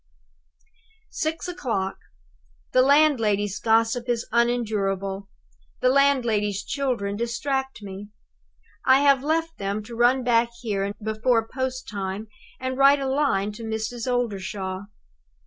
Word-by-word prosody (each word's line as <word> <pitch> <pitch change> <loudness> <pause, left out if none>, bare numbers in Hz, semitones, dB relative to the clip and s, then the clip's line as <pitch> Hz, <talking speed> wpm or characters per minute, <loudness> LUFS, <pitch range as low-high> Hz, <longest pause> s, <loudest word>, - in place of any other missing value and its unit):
"Six 315 +2 -2
o'clock. 230 - -3 0.7
The 255 - +5
landlady's 230 -8 +3
gossip 230 +2 +2
is 235 -1 0
unendurable; 200 -5 0 0.5
the 255 - +3
landlady's 235 -8 +2
children 240 -8 -1
distract 265 +2 -2
me. 200 +1 -8 0.7
I 265 +1 +5
have 275 -2 +4
left 325 +2 -1
them 200 +2 -2
to 235 +2 -9
run 245 +2 +3
back 235 -1 +3
here 200 -4 -1
before 225 +1 +1
post 260 +1 -4
time 200 +1 -4 0.3
and 260 +1 -3
write 280 +1 +6
a 275 - -2
line 265 -8 +1
to 220 +2 -9
Mrs. 225 +3 -3
Oldershaw. 195 -5 -3
235 Hz, 115 wpm, -24 LUFS, 205-265 Hz, 0.7 s, write